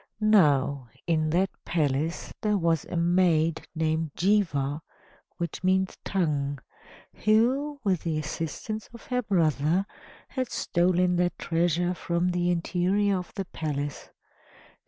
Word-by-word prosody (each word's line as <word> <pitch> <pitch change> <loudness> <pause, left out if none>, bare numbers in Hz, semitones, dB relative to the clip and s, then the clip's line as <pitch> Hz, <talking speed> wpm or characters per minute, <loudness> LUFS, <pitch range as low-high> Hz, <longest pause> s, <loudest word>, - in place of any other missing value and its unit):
Now, 145 - +3 0.2
in 155 -2 +1
that 185 +4 +2
palace 155 0 -1
there 210 -1 +2
was 165 -4 +1
a 175 - -4
maid 170 -2 +2
named 160 -1 -1
Jihva 165 -8 +1 0.6
(which 170 -1 -4
means 190 0 +2
Tongue), 145 -7 0 0.7
who, 260 +7 +2
with 190 -5 +1
the 160 -2 -1
assistance 165 +8 -4
of 235 - -12
her 250 -1 0
brother, 170 - +1 0.4
had 260 -3 -3
stolen 180 0 +1
that 175 0 +1
treasure 175 +1 +1
from 170 0 -1
the 175 0 0
interior 185 +3 +1
of 180 - -8
the 195 -2 -3
palace. 145 -4 -4
175 Hz, 120 wpm, -27 LUFS, 155-190 Hz, 0.7 s, Now